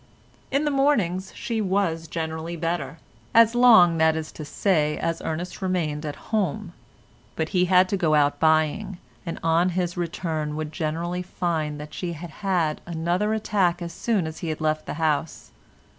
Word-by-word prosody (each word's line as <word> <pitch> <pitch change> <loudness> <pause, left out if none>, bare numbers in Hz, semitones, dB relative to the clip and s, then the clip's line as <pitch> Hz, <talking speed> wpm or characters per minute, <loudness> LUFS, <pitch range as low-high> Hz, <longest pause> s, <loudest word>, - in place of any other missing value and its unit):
In 280 +3 +1
the 295 - +1
mornings 210 -10 +1
she 230 -2 -2
was 185 -5 0
generally 160 +1 -4
better, 165 0 -3 0.4
as 230 0 +7
long 220 -9 +6
that 160 0 +4
is 160 -1 -4
to 155 - -8
say 150 -1 +1
as 165 0 -2
Ernest 170 +5 -4
remained 160 -5 -1
at 145 - -4 0.2
home; 200 -2 -1 0.6
but 160 0 -2
he 180 -2 +2
had 185 0 +5
to 200 - 0
go 160 -4 +2
out 145 -1 +2
buying, 160 +5 +2 0.3
and 165 - -3
on 165 +2 +3
his 175 -1 -1
return 160 -3 -3
would 155 0 -4
generally 170 +2 -2
find 160 -5 -2
that 150 0 -9
she 175 -2 -4
had 170 +1 -8
had 175 -6 0
another 175 +6 0
attack 190 -5 +1
as 170 -1 -6
soon 210 -2 0
as 160 0 -6
he 170 - -4
had 155 - -3
left 155 -1 -1
the - - -4
house. 155 0 -1
170 Hz, 175 wpm, -24 LUFS, 155-185 Hz, 0.6 s, as